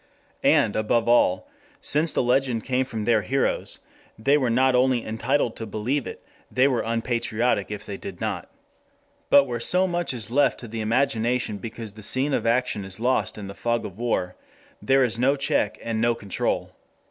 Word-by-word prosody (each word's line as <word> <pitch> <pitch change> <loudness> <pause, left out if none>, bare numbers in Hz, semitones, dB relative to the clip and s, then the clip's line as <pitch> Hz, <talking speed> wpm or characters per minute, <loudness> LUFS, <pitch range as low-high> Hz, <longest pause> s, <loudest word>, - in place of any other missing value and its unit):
And, 105 - +3
above 115 +2 +1
all, 95 -6 +3 0.3
since 155 +2 +2
the - - +1
legend 125 -2 +1
came 130 0 0
from 110 -4 -5
their 115 -2 +3
heroes, 135 +8 -1 0.4
they 135 +6 +3
were 130 -5 +1
not 130 +3 +3
only 125 -1 +2
entitled 115 +2 0
to 115 - -6
believe 115 +6 -2
it, - - -9 0.2
they 130 +2 +3
were 130 -4 +1
unpatriotic 115 -1 -1
if 105 -1 -6
they 100 - -6
did - - -8
not. - - -4 0.8
But 140 - +7
where 120 -3 -4
so 180 +10 +2
much 175 -5 -1
is 115 -4 -2
left 145 +3 +2
to 120 - -8
the 115 0 -5
imagination 120 -1 0
because 110 +1 -7
the 110 +2 -13
scene 130 +7 +1
of - - 0
action 120 -3 +1
is 95 +1 -5
lost 125 0 0
in 105 - -7
the 100 - -7
fog 120 +3 -1
of 95 +2 -9
war, 95 -7 -1 0.5
there 135 0 +3
is 115 -2 0
no 135 +3 +3
check 140 -6 0
and 115 -1 -2
no 120 0 +2
control. 100 -4 -2
120 Hz, 185 wpm, -24 LUFS, 110-130 Hz, 0.8 s, But